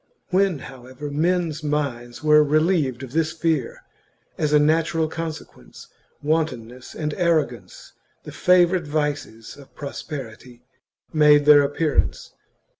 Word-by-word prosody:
When, 190 -2 +2
however, 130 +2 -9
men's 165 0 -1
minds 140 -5 -3
were 150 0 +6
relieved 150 -4 +1
of 130 - -9
this 160 +1 0
fear, 160 -6 -2 0.5
as 150 -2 -1
a 150 - +5
natural 160 +2 +1
consequence, 160 -1 -8 0.3
wantonness 130 -6 -3
and 150 -1 -3
arrogance, 145 - -2 0.3
the - - -9
favourite 180 -2 +3
vices 145 -6 -4
of 140 -2 -17
prosperity, 125 -4 -8 0.5
made 150 -2 +5
their 150 -1 +8
appearance. 145 +2 -1
150 Hz, 115 wpm, -22 LUFS, 135-160 Hz, 0.5 s, their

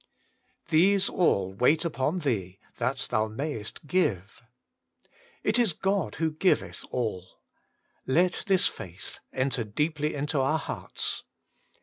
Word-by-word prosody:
* - - -42
These 190 +5 +5
all 100 - +2
wait 145 - +3
upon 160 +2 0
Thee, 100 - -1 0.2
that - - -1
thou 110 0 +2
mayest 110 +1 -5
give, 115 - 0 0.5
' - - -33 0.3
It 215 +3 +3
is 225 -8 +3
God 195 - 0
who 160 0 0
giveth 170 +5 +1
all: 105 -7 -3 0.7
let 175 +7 +2
this 195 -1 +4
faith 90 -1 -4
enter 130 -2 0
deeply 150 +8 -1
into 145 0 0
our 150 +4 +2
hearts. - - -3
145 Hz, 125 wpm, -28 LUFS, 110-175 Hz, 0.7 s, These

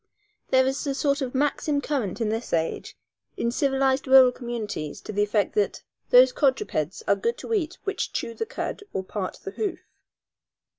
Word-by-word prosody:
There 260 0 +4
is 270 +3 -2
a 275 - -1
sort 280 +1 +1
of 260 -1 -3
maxim 290 +1 +1
current 255 -9 -2
in 220 - +1
this 225 +2 -3
age, 165 -1 -2 0.4
in 235 - 0
civilized 270 0 +1
rural 260 -1 +8
communities, 230 - -5
to - - -7
the 205 - +1
effect 205 0 +1
that 420 0 0 0.3
those - - +7
quadrupeds 325 - 0
are - - +4
good 465 +1 -1
to 460 - -5
eat 355 -6 -1
which 395 - -2
"chew 230 - -3
the 450 - -4
cud - - -4
or 190 - -2
part 190 0 -4
the 195 - -5
hoof." 400 - -2
265 Hz, 180 wpm, -25 LUFS, 225-300 Hz, 0.4 s, rural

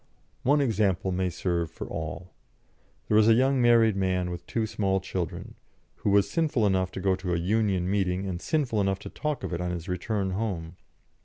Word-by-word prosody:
One 145 +3 +3
example 100 -7 +1
may 90 0 0
serve 85 -1 -1
for - - -7
all. 85 +3 -6 0.7
There 105 - +2
was 110 0 +6
a 115 - +7
young 130 +2 +3
married 115 -3 +5
man 90 -2 0
with 85 0 -6
two 115 -2 -1
small 95 -3 0
children, 90 -3 -5 0.4
who - - -1
was 100 0 +4
sinful 155 -9 +1
enough 95 -2 +1
to - - -4
go 95 0 +2
to 90 -2 -2
a - - +1
Union 95 0 +1
meeting 95 -1 0
and 90 -2 -4
sinful 135 -9 0
enough 95 -1 +1
to 100 - -9
talk 150 -3 -3
of - - -3
it 85 - -2
on 90 - -2
his 85 0 -5
return 95 +2 -2
home. 90 -5 -3
95 Hz, 200 wpm, -27 LUFS, 90-110 Hz, 0.7 s, a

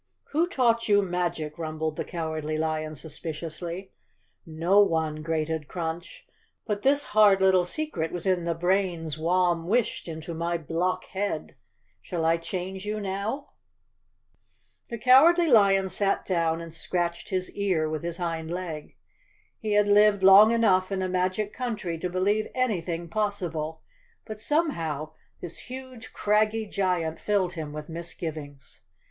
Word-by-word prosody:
"Who 325 +4 +2
taught 235 -7 +1
you 205 -1 +5
magic?" 175 -4 -2
rumbled 155 -1 -3
the - - -2
Cowardly 155 -2 -3
lion 155 0 -2
suspiciously. 160 +3 -6
ace 190 - -7
_ - - -22
Chapter - - -40
Twenty 160 -1 -10
"No 195 +4 +5
one," 160 -5 +2
grated 160 -1 -2
Crunch, 170 0 -5 0.4
"but 205 -2 -2
this 285 +3 +3
hard 210 -2 +6
little 190 -2 +4
secret 180 - -3
was 175 0 -5
in 185 -2 +2
the 170 0 -1
brains 175 -3 0
Warn 170 0 +1
wished 230 0 0
into 160 0 -6
my 170 +1 -1
block 165 +3 -1
head. 200 +1 -3 0.5
Shall 170 -3 -3
I 165 +1 +3
change 185 +2 -5
you 210 +1 -3
now?" 200 +7 -3 1.4
The 235 - -4
Cowardly 280 +9 +6
Lion 195 -4 +5
sat 195 +1 0
down 165 -3 0
and 165 -1 -9
scratched 170 0 -2
his 185 -1 -2
ear 185 -6 +1
with 155 0 -3
his 170 0 -4
hind 165 -2 -3
leg. 170 -4 -5 0.6
He 215 -1 -2
had 205 0 +4
lived 205 -1 +5
long 195 +3 +9
enough 200 -5 +3
in 190 -1 -1
a - - 0
magic 185 +3 -1
country 215 -10 -3
to 180 - -2
believe 200 +4 0
anything 175 -9 -1
possible, 170 -6 -3 0.4
but 215 -1 -7
somehow 165 - -1 0.3
this 170 -2 -8
huge, 255 -2 -9
craggy 215 +1 +1
giant 180 -5 -1
filled 195 -4 0
him 155 -4 -5
with 150 0 -7
misgivings. 160 -4 -7
180 Hz, 150 wpm, -26 LUFS, 165-205 Hz, 1.4 s, long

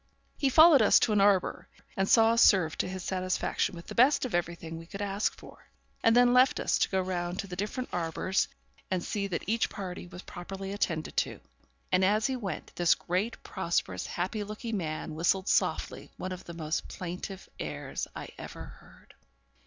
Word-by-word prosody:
He 275 - +1
followed 310 0 +8
us 215 - +6
to 225 - +2
an 205 - +4
arbour, 195 -2 +2 0.3
and 195 0 0
saw 225 -1 +6
us 230 - +3
served 175 -5 +4
to - - +1
his 185 0 -5
satisfaction 185 -1 -1
with 170 - -10
the - - -8
best 260 +3 +4
of 255 - -5
everything 170 -1 -2
we 165 - -11
could 195 - -8
ask 200 0 -1
for; - - -15 0.4
and 225 0 +5
then 245 0 +6
left 255 +1 +5
us - - +1
to - - +2
go 190 - +1
round 180 -1 -2
to - - -3
the 185 -2 -7
different 210 +7 -3
arbours 175 +3 0 0.4
and 185 -2 -1
see 200 -2 -2
that 175 -3 -3
each 225 +3 +1
party 180 -3 -6
was 180 +1 -10
properly 195 +2 -7
attended 165 -6 -2
to; - - 0 0.5
and, 185 - +3
as 210 +3 +3
he 265 - 0
went, 200 -9 -6
this 175 -1 +4
great, 185 +7 -2
prosperous, - - -2
happy 215 -2 -2
looking 215 +2 -5
man 155 -2 -4
whistled 180 +5 +1
softly - - 0
one 185 - -5
of 185 0 -7
the 170 - -8
most 160 -1 -3
plaintive 180 +2 -6
airs - - -4
I - - -7
ever - - -8
heard. - - -17
190 Hz, 190 wpm, -29 LUFS, 175-215 Hz, 0.5 s, followed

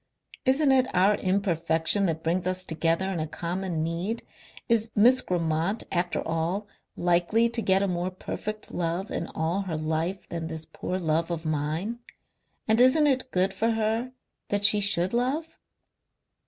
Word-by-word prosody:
Isn't 270 +2 +4
it 260 -1 +4
our 190 +3 +5
imperfection 185 -1 +1
that 160 -1 -2
brings 175 +2 0
us 185 0 -1
together 165 +2 0
in 180 - -2
a 155 - -2
common 170 0 -3
need? 175 +8 -3 0.4
Is 230 -1 +2
Miss 245 +5 +6
Grammont, 170 +3 -1
after 175 0 -1
all, 165 +6 -1 0.3
likely 175 +7 +2
to 235 0 -1
get 190 -1 +3
a - - +1
more 180 0 -1
perfect 215 +3 -6
love 175 +4 -2
in - - -3
all 165 +5 0
her 180 -5 -3
life 160 +5 -2
than 165 -1 -4
this 160 -1 -5
poor 185 - -4
love 165 -1 0
of 165 -1 -4
mine? 155 +9 -2 0.7
And 220 +2 +4
isn't 260 +5 +5
it 260 -2 +2
good 190 -2 +1
for 220 +4 0
her 225 +3 -1 0.4
that 205 0 +1
she 210 +1 +6
should 190 -2 +1
love?" 275 +7 -1
185 Hz, 160 wpm, -26 LUFS, 165-220 Hz, 0.7 s, Miss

